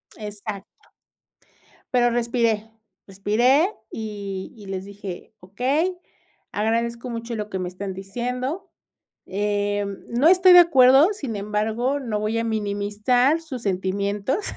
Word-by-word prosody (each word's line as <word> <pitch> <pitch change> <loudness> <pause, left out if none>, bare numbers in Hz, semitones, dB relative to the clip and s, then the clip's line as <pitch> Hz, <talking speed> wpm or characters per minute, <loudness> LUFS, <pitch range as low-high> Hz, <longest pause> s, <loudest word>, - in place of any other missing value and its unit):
Exacto. 205 -1 -8 1.0
Pero 240 -1 +4
respiré, 230 -2 0 0.4
respiré 240 - +3 0.2
y 200 -3 -6
y 205 - -12
les 190 0 -5
dije: 200 0 -8
"Okey, 275 - -1 0.5
agradezco 235 +3 -1
mucho 230 0 -5
lo 210 -1 -4
que 190 - -3
me 180 -1 -3
están 190 +1 -6
diciendo, 250 - -4 0.6
em, 205 0 -1
no 250 +7 +3
estoy 370 0 +7
de 355 - +11
acuerdo, 275 +2 +6
sin 270 - -5
embargo, 215 +6 -1
no 220 -5 -2
voy 215 +2 -1
a 230 - -1
minimizar 215 +7 +1
sus 265 -7 -7
sentimientos". 200 - -1
220 Hz, 120 wpm, -23 LUFS, 200-255 Hz, 1.0 s, de